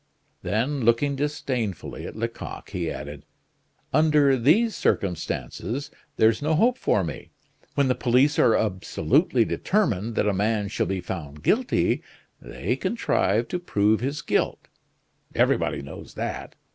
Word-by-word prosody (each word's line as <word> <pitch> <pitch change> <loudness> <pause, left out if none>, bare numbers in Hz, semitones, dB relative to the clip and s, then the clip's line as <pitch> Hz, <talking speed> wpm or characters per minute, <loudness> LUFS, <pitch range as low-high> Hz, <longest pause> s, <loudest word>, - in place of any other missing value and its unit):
Then, 125 +8 -1
looking 120 +5 +3
disdainfully 130 - -3
at - - -9
Lecoq, 115 +1 -5
he 85 -3 -2
added: 75 -1 -7 0.7
"Under 150 -2 +4
these 175 - +3
circumstances 100 - -2 0.3
there's 110 +2 +4
no 155 +2 +1
hope 245 +9 +3
for 100 - +2
me. 85 - -6 0.5
When 140 -1 +3
the 130 - +3
police 130 +5 +2
are 115 - +5
absolutely 95 -4 +1
determined 115 - 0
that - - +1
a 105 - +2
man 105 +1 0
shall - - -1
be 95 -1 -2
found 75 -6 -7
guilty, - - +2 0.4
they - - -3
contrive 110 +5 +1
to 180 - -2
prove 105 - +2
his 140 +5 -3
guilt; - - -1 0.7
everybody - - +1
knows - - -10
that. - - -5
115 Hz, 135 wpm, -25 LUFS, 100-145 Hz, 0.7 s, are